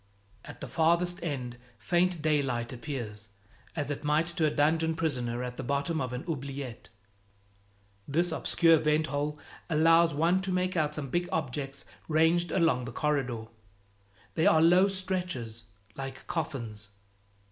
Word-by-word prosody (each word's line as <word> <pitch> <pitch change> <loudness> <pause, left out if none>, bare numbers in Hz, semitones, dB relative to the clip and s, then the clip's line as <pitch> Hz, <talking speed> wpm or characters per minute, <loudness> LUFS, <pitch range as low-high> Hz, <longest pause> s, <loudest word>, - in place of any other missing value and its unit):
At - - -11
the - - -4
farthest 170 +2 +2
end 125 -7 -4 0.2
faint 175 -2 +1
daylight 135 -6 0
appears, 120 -5 -5 0.5
as 145 -2 -1
it 145 - -4
might 150 +2 +2
to 165 -2 0
a - - +3
dungeon 160 +2 +2
prisoner 125 -7 -1
at 125 0 -5
the - - -4
bottom 140 +5 -1
of 130 -2 -3
an 125 +3 -4
oubliette. 140 -5 -5 1.2
This 170 +5 +1
obscure 165 -2 +4
vent 155 +1 +2
hole 150 0 -2 0.3
allows 165 0 +5
one 170 +5 +3
to 195 -1 -3
make 185 +1 0
out 150 -2 +1
some 140 -3 -4
big 175 +3 0
objects 135 -2 -3 0.2
ranged 160 +2 +3
along 165 -9 +2
the 120 - -6
corridor; 130 -5 -1 0.9
they 160 - +2
are 160 - +6
low 175 +4 +6
stretchers, 180 - -3 0.3
like 135 -1 -7
coffins. 120 - -4
150 Hz, 145 wpm, -29 LUFS, 130-165 Hz, 1.2 s, are